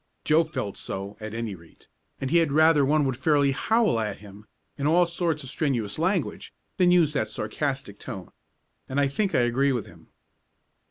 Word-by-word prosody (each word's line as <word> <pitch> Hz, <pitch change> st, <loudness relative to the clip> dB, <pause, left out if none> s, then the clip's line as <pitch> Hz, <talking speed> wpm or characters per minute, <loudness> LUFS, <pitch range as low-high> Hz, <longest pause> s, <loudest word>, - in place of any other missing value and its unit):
Joe 155 Hz, +2 st, +4 dB
felt 130 Hz, -10 st, -5 dB
so, 100 Hz, +1 st, -6 dB
at 110 Hz, 0 st, -7 dB
any 115 Hz, -3 st, -3 dB
rate, 85 Hz, -3 st, -16 dB, 0.3 s
and 135 Hz, 0 st, -3 dB
he 170 Hz, -, +5 dB
had 165 Hz, -4 st, +2 dB
rather 155 Hz, 0 st, +5 dB
one 150 Hz, +2 st, +2 dB
would 130 Hz, -2 st, 0 dB
fairly 140 Hz, 0 st, +3 dB
howl 215 Hz, -, +2 dB
at 105 Hz, -2 st, -3 dB
him, 105 Hz, +1 st, -14 dB, 0.3 s
in 145 Hz, 0 st, -1 dB
all 175 Hz, +3 st, +4 dB
sorts 170 Hz, -3 st, -1 dB
of 130 Hz, -, -8 dB
strenuous 125 Hz, -7 st, -1 dB
language, 185 Hz, +5 st, -1 dB, 0.3 s
than 180 Hz, -2 st, +4 dB
use 170 Hz, -4 st, +4 dB
that 130 Hz, -7 st, 0 dB
sarcastic 110 Hz, 0 st, -4 dB
tone. 95 Hz, -2 st, -8 dB, 0.6 s
And 135 Hz, +2 st, -1 dB
I 140 Hz, -, +3 dB
think 190 Hz, +5 st, -1 dB
I -, -, +4 dB
agree 130 Hz, +4 st, +2 dB
with 120 Hz, -5 st, -2 dB
him. -, -, -17 dB
140 Hz, 185 wpm, -26 LUFS, 110-160 Hz, 0.6 s, he